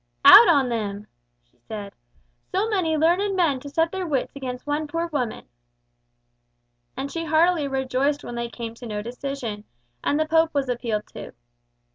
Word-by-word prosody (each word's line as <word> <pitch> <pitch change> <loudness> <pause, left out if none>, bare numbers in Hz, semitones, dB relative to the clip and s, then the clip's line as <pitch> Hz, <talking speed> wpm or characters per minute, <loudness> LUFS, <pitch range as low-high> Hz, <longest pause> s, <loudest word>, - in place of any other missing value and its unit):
"Out 470 - +11
on 280 -6 +4
them!" 210 -3 -3 0.4
she 120 0 -38
said. 200 - -8 0.6
"So 390 +4 0
many 360 -8 0
learned 360 +6 +2
men 325 -8 +2
to 285 - -9
set 325 +3 +1
their 380 -2 -3
wits 275 -3 -2
against 255 -2 -6
one 295 +1 -2
poor 330 +3 -2
woman!" 250 -6 -3 1.5
And 275 +1 -4
she 330 +1 -4
heartily 320 -1 +2
rejoiced 270 +2 -1
when 240 - -7
they 235 0 -4
came 230 -1 -7
to 235 +1 -10
no 210 -1 -4
decision, 240 -3 -5 0.4
and 290 - +1
the 310 - +2
Pope 320 0 +2
was 275 -2 0
appealed 230 -4 -2
to. - - -9
280 Hz, 165 wpm, -24 LUFS, 235-325 Hz, 1.5 s, Out